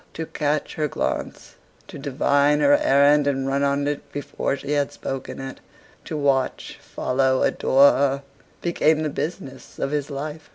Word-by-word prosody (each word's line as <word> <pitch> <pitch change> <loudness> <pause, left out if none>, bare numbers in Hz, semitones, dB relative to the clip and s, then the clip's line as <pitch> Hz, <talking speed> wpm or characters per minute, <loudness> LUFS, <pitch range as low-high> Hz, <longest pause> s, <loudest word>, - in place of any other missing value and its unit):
To 160 - -4
catch 150 -1 -2
her 155 -1 -1
glance, - - -4 0.3
to - - -9
divine 145 +1 +2
her 145 0 +5
errand 145 +1 +4
and 135 -1 0
run 135 +1 0
on 140 0 +1
it 145 0 -4
before 140 -1 -3
she 140 - -6
had 145 -1 +1
spoken 135 0 -6
it; 135 0 -7 0.5
to 155 - -4
watch, 140 -2 -1
follow, 130 0 0
adore 140 +2 +5
her; 140 0 0 0.4
became 160 -2 +2
the 155 - -1
business 150 -3 -6
of 135 - -2
his 145 -1 -2
life. 150 +2 -6
140 Hz, 160 wpm, -23 LUFS, 135-150 Hz, 0.5 s, her